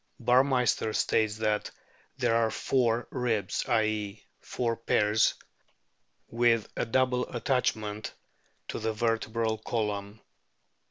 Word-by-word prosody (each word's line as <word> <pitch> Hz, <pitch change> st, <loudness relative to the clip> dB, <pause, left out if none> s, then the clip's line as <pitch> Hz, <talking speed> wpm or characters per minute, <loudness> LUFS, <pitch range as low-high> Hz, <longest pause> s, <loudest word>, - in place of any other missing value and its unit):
Burmeister 125 Hz, -2 st, +2 dB
states 110 Hz, -1 st, +1 dB
that 105 Hz, -1 st, 0 dB, 0.5 s
there 115 Hz, -, +2 dB
are 115 Hz, -1 st, +3 dB
four 120 Hz, -1 st, 0 dB
ribs, 115 Hz, -7 st, -1 dB
i.e., 110 Hz, -2 st, -1 dB
four 115 Hz, -2 st, -2 dB
pairs 110 Hz, -1 st, +2 dB, 0.9 s
with 115 Hz, -2 st, +2 dB
a -, -, -1 dB
double 125 Hz, +1 st, +1 dB
attachment 110 Hz, -4 st, -1 dB, 0.6 s
to -, -, -3 dB
the 110 Hz, 0 st, -1 dB
vertebral 115 Hz, 0 st, -1 dB
column. 105 Hz, -2 st, -3 dB
115 Hz, 100 wpm, -29 LUFS, 110-120 Hz, 0.9 s, are